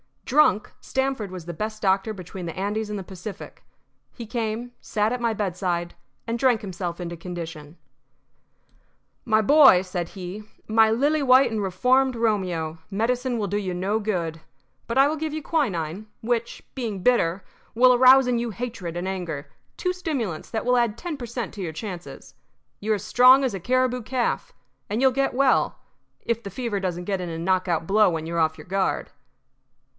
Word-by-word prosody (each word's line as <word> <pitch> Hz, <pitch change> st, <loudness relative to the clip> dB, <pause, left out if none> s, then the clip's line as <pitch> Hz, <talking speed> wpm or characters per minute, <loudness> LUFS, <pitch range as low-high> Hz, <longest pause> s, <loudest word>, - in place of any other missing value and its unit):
Drunk, 270 Hz, -8 st, +3 dB
Stamford 265 Hz, -6 st, -2 dB
was 180 Hz, -3 st, -8 dB
the 175 Hz, -, -5 dB
best 215 Hz, +5 st, -5 dB
doctor 195 Hz, +2 st, +1 dB
between 185 Hz, -1 st, -8 dB
the 165 Hz, -, -6 dB
Andes 210 Hz, +3 st, -2 dB
and 210 Hz, -, -3 dB
the 195 Hz, -, -5 dB
Pacific. 190 Hz, +2 st, -9 dB, 0.5 s
He 235 Hz, -, -8 dB
came, 230 Hz, +1 st, -3 dB
sat 210 Hz, 0 st, 0 dB
at 250 Hz, -, -2 dB
my 235 Hz, -1 st, 0 dB
bedside, 180 Hz, -4 st, -2 dB, 0.3 s
and 230 Hz, +1 st, -2 dB
drank 250 Hz, -4 st, +3 dB
himself 180 Hz, -3 st, -5 dB
into 170 Hz, -1 st, -5 dB
condition. 165 Hz, -3 st, -7 dB, 1.5 s
"My 220 Hz, -1 st, +3 dB
boy," 270 Hz, -5 st, +7 dB
said 180 Hz, -2 st, -4 dB
he, 190 Hz, +2 st, -7 dB, 0.3 s
"my 220 Hz, 0 st, +5 dB
lily 290 Hz, +7 st, +2 dB
white 260 Hz, -2 st, +5 dB
and 220 Hz, -1 st, -1 dB
reformed 250 Hz, +8 st, +2 dB
Romeo, 180 Hz, -8 st, -1 dB
medicine 245 Hz, +4 st, 0 dB
will 210 Hz, -2 st, -1 dB
do 205 Hz, -, -1 dB
you 190 Hz, -3 st, -2 dB
no 195 Hz, +5 st, 0 dB
good. 175 Hz, -7 st, -2 dB, 0.5 s
But 230 Hz, -, -2 dB
I 270 Hz, +1 st, +7 dB
will 310 Hz, -, -2 dB
give 310 Hz, 0 st, -3 dB
you 310 Hz, -1 st, -4 dB
quinine, 205 Hz, -, -1 dB
which, 235 Hz, 0 st, -2 dB
being 220 Hz, -8 st, -4 dB
bitter, 190 Hz, -7 st, +2 dB, 0.3 s
will 250 Hz, +2 st, +6 dB
arouse 260 Hz, +1 st, +7 dB
in 245 Hz, -1 st, +1 dB
you 235 Hz, -1 st, -2 dB
hatred 200 Hz, -6 st, -5 dB
and 175 Hz, +2 st, -3 dB
anger 160 Hz, -7 st, -5 dB, 0.2 s
two 365 Hz, -, -1 dB
stimulants 275 Hz, -, -3 dB
that 220 Hz, 0 st, -3 dB
will 250 Hz, 0 st, +3 dB
add 235 Hz, -2 st, +1 dB
ten 335 Hz, +2 st, -5 dB
per 245 Hz, -, -6 dB
cent. 235 Hz, -3 st, -4 dB
to 200 Hz, -, -6 dB
your 165 Hz, -4 st, -4 dB
chances. 180 Hz, -1 st, -8 dB, 0.5 s
You 215 Hz, +1 st, 0 dB
are -, -, +2 dB
as 200 Hz, -, -6 dB
strong 255 Hz, +5 st, +6 dB
as 260 Hz, -, 0 dB
a 195 Hz, -, -4 dB
caribou 250 Hz, +4 st, +1 dB
calf, 245 Hz, +2 st, -2 dB, 0.4 s
and 215 Hz, +4 st, -1 dB
you 265 Hz, -, +6 dB
will -, -, -5 dB
get 275 Hz, +1 st, 0 dB
well 270 Hz, 0 st, +3 dB, 0.4 s
if 230 Hz, -1 st, -1 dB
the 200 Hz, -, -7 dB
fever 225 Hz, 0 st, -3 dB
doesn't 180 Hz, -2 st, -3 dB
get 195 Hz, 0 st, -2 dB
in 175 Hz, -, -4 dB
a 165 Hz, -, -5 dB
knockout 180 Hz, -1 st, 0 dB
blow 210 Hz, +3 st, +4 dB
when 160 Hz, -2 st, -3 dB
you're 170 Hz, +1 st, -2 dB
off 160 Hz, -1 st, +1 dB
your -, -, -11 dB
guard." 190 Hz, +1 st, -1 dB
215 Hz, 185 wpm, -24 LUFS, 180-245 Hz, 1.5 s, boy